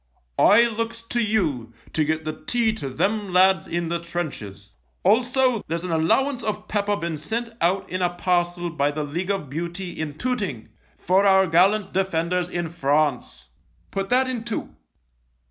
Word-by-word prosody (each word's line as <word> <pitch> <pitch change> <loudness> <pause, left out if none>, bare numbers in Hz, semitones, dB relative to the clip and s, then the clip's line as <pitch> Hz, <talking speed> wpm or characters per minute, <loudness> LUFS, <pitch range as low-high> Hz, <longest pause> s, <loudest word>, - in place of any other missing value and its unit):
I 220 +3 +7
looks 230 0 -2
to 240 +1 -1
you 150 - 0 0.2
to 155 - +2
get 155 +1 -1
the 155 0 -5
tea 235 -3 +2
to 200 -11 -5
them 200 +9 -1
lads 185 -1 +4
in 170 -1 -2
the 170 0 -1
trenches. 140 - -6 0.3
Also, 250 +3 +3
there's 165 +1 -3
an 180 - -3
allowance 250 - +2
of 215 -1 -4
pepper 205 -1 0
been 170 -5 -4
sent 230 +9 -3
out 185 +3 +1
in 185 0 -3
a 180 - +3
parcel 175 -1 -1
by 145 -3 +1
the 150 +1 -3
League 170 +6 -4
of 195 -7 -1
Beauty 170 +6 -4
in 155 -3 -5
Tooting 205 - -3 0.3
for 195 +2 +3
our 190 0 +5
gallant 190 +4 +3
defenders 180 -1 0
in 175 -1 -2
France 140 - -1 0.2
— - - -38
put 195 0 -3
that 260 +1 +3
in 250 -3 -3
too.' 230 -2 -5
180 Hz, 170 wpm, -23 LUFS, 160-215 Hz, 0.3 s, I